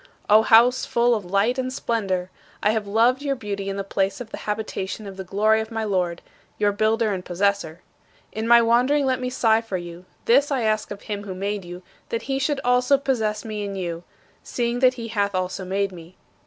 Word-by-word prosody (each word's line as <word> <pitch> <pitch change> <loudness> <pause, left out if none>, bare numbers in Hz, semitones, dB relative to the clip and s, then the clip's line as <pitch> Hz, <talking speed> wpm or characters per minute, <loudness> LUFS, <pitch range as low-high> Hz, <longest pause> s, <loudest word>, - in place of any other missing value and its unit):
O 215 +1 +8
house 235 +3 +5
full 240 +1 +2
of 210 -5 -2
light 210 +7 +1
and 255 0 -2
splendor! 195 -8 -2 0.3
"I 210 - +4
have 220 -2 -2
loved 235 +6 +3
your 280 -1 -1
beauty 200 -4 -4
and 195 - -4
the 195 - -2
place 195 0 -1
of 235 -3 -8
the - - -6
habitation 210 -1 -4
of 195 -1 -8
the 190 - -6
glory 215 +4 +2
of 220 - -6
my 225 -1 -3
Lord," 180 -5 -1 0.3
your 205 -1 +2
builder 215 +1 +1
and 185 -1 -4
possessor. 180 -3 -1 0.5
In 220 +1 -3
my 235 0 +7
wandering 250 +5 +3
let 260 -1 +1
me 250 - -2
sigh 225 -3 +2
for 225 -5 -4
you; 175 0 -9 0.2
this 275 +5 +4
I 265 -4 0
ask 215 -1 0
of 205 - -8
him 205 -1 -5
who 190 -2 -6
made 200 +1 -3
you, 175 +1 -9 0.3
that 230 - -3
he 270 0 -2
should 290 0 0
also 250 +2 +4
possess 220 -6 -1
me 215 -2 -4
in 200 -1 -4
you, 170 -2 -4 0.4
seeing 240 0 -2
that 255 0 +4
he 230 -2 -6
hath 200 -3 -1
also 185 +1 -2
made 195 +1 -1
me. 175 0 -12
215 Hz, 215 wpm, -23 LUFS, 195-235 Hz, 0.5 s, O